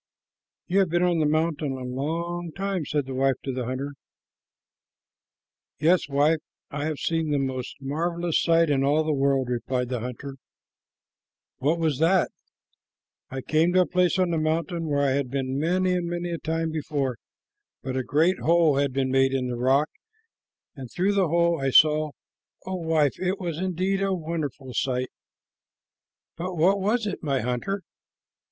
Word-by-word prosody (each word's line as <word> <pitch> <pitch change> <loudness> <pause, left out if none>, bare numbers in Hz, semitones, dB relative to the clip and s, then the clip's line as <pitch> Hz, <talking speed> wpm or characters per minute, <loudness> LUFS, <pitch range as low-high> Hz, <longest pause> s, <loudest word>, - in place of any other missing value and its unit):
"You 190 +2 +2
have 190 -3 +3
been 175 +2 +1
on 175 -2 +2
the 155 - +2
mountain 155 -2 0
a 130 -1 -6
long 165 +7 -3
time," 195 -1 -2
said 145 -2 0
the 135 - -6
wife 135 0 +2
of 135 - -2
the 125 -1 -3
hunter. 130 +3 -4 1.9
"Yes, 165 +1 +3
wife, 145 +3 +3 0.3
and 145 - -4
I - - -1
have 155 -2 -2
seen 165 0 -1
the 145 - +1
most 130 -2 -3
marvelous 170 +4 -1
sight 165 -2 +3
in 135 -1 +2
all 145 +3 +3
the 155 0 0
world," 135 -2 +1
replied 125 0 -2
the 125 -2 -2
hunter. 125 +4 -6 1.2
"What 150 +5 +1
was 155 -5 0
that?" 175 +3 +3 1.0
"I 135 0 -5
came 160 +5 +2
to 185 - +5
a - - +3
place 180 +3 +2
on 185 -2 +2
the 165 - +1
mountain 165 +1 -1
where 145 -1 +1
I 135 - +2
had 135 -1 0
been 135 0 -2
many 180 +4 +1
and 175 -1 -1
many 175 0 -3
a 170 - -3
time 165 0 -2
before, 140 -5 -2 0.7
but 130 0 -3
a 130 - +1
great 160 +8 +2
hole 165 -3 +3
had 140 -2 +1
been 130 -1 0
made 135 0 +3
in 125 -1 -1
the 120 - -2
rock, 135 +5 +2 0.9
and 130 -4 -8
through 190 - +1
the 195 -3 +2
hole 170 -1 +2
I 135 - +1
saw 155 +2 +5 0.6
oh, 185 - -3
wife, 160 -4 +1
it 185 +1 -1
was 170 -4 -3
indeed 185 +1 -1
a 195 -1 +1
wonderful 155 -6 -4
sight!" 130 0 -1 1.3
"But 180 +2 -4
what 185 +5 +3
was 215 +4 +1
it, 205 - -4
my 140 -4 0
hunter?" 125 - -2
155 Hz, 175 wpm, -25 LUFS, 135-175 Hz, 1.9 s, to